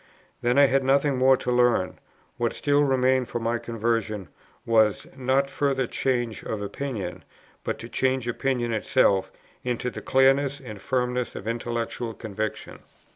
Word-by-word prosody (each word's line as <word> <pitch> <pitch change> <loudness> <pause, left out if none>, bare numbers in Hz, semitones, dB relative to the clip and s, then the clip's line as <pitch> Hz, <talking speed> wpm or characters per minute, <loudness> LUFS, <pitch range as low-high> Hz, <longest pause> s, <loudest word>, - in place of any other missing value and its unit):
Then, 120 +2 +2
I 140 - +8
had 135 0 +2
nothing 140 +1 +3
more 130 0 +6
to 125 - -2
learn; 120 -6 +2 0.4
what 120 -1 0
still 145 0 +2
remained 130 -2 +2
for - - -3
my 115 0 -1
conversion, 115 -4 -2 0.4
was, 110 -3 +3
not 135 +1 +1
further 135 -2 0
change 120 -2 -1
of 110 - -3
opinion, 105 -2 -5 0.4
but - - -2
to 115 - -8
change 130 0 0
opinion 120 -1 -1
itself 95 -2 +2 0.3
into 125 0 -2
the - - -7
clearness 135 +1 +3
and 110 -7 -9
firmness 125 -2 -1
of 105 - -7
intellectual 115 0 -3
conviction. 110 -1 -5
125 Hz, 145 wpm, -25 LUFS, 115-130 Hz, 0.4 s, I